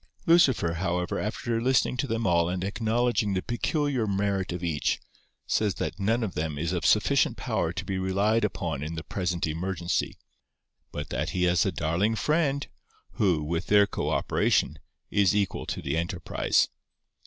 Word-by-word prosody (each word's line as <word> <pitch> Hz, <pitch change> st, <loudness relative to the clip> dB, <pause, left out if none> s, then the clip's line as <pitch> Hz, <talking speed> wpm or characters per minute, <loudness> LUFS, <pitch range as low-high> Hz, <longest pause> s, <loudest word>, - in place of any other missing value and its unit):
Lucifer, 135 Hz, -, +4 dB
however, 90 Hz, +1 st, -1 dB
after 115 Hz, +2 st, -2 dB
listening 130 Hz, 0 st, +2 dB
to 125 Hz, +3 st, -1 dB
them 115 Hz, -1 st, -1 dB
all 85 Hz, -2 st, +3 dB
and 90 Hz, 0 st, -2 dB
acknowledging 110 Hz, +1 st, 0 dB
the 95 Hz, -, 0 dB
peculiar 130 Hz, 0 st, -1 dB
merit 100 Hz, -2 st, 0 dB
of 90 Hz, 0 st, -5 dB
each, 80 Hz, -4 st, 0 dB, 0.5 s
says 105 Hz, -3 st, +1 dB
that -, -, -4 dB
none 115 Hz, +4 st, +1 dB
of 105 Hz, -, -3 dB
them 75 Hz, -1 st, -3 dB
is 85 Hz, +4 st, -2 dB
of 90 Hz, -, 0 dB
sufficient -, -, +3 dB
power -, -, -1 dB
to -, -, -5 dB
be 95 Hz, -1 st, -2 dB
relied 100 Hz, +4 st, +1 dB
upon 85 Hz, -8 st, -2 dB
in 80 Hz, +2 st, -4 dB
the 80 Hz, -, -5 dB
present 90 Hz, -3 st, -2 dB
emergency, 85 Hz, +2 st, -2 dB, 0.7 s
but -, -, -5 dB
that -, -, -2 dB
he 90 Hz, -, +2 dB
has 90 Hz, -2 st, +3 dB
a -, -, +1 dB
darling 90 Hz, +8 st, 0 dB
friend, 145 Hz, +1 st, +1 dB, 0.5 s
who, 90 Hz, -9 st, +2 dB
with 85 Hz, +4 st, -2 dB
their 105 Hz, 0 st, +6 dB
co -, -, -3 dB
operation, 75 Hz, -, +1 dB, 0.3 s
is 100 Hz, -2 st, +3 dB
equal 100 Hz, -3 st, -1 dB
to -, -, -4 dB
the 70 Hz, +2 st, -1 dB
enterprise. 85 Hz, +2 st, 0 dB
95 Hz, 165 wpm, -27 LUFS, 85-115 Hz, 0.7 s, their